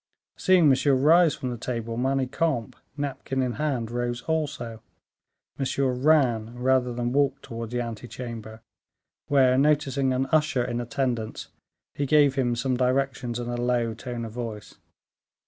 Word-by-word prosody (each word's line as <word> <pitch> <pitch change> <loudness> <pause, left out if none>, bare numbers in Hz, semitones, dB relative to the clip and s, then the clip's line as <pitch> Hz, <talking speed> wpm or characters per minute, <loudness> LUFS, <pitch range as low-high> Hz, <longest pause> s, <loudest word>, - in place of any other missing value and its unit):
Seeing 185 -4 +4
Monsieur 135 0 +4
rise 160 +4 +5
from 125 - -4
the 120 - -6
table, 115 -2 -4
Manicamp, 135 0 0 0.2
napkin 135 -2 -2
in 125 -1 -1
hand, 125 -7 -1
rose 120 0 -2
also. 145 -8 -3 0.8
Monsieur 135 -1 0
ran 125 -4 +2
rather 125 0 +2
than 120 0 -2
walked, 140 -1 +1
towards 115 -1 -6
the 125 0 -1
ante 115 0 -6
chamber, 115 -2 -8 0.7
where, 130 -2 +4
noticing 140 -2 +2
an 130 +1 +1
usher 150 -5 +2
in 120 -1 -2
attendance, 120 -2 -3 0.4
he 140 - -2
gave 145 -1 +5
him 125 -3 0
some 125 +2 0
directions 125 -1 0
in 120 -1 -4
a 120 0 -3
low 120 -2 +1
tone 120 0 -6
of 110 - -7
voice. 115 -3 -6
125 Hz, 145 wpm, -26 LUFS, 120-140 Hz, 0.8 s, rise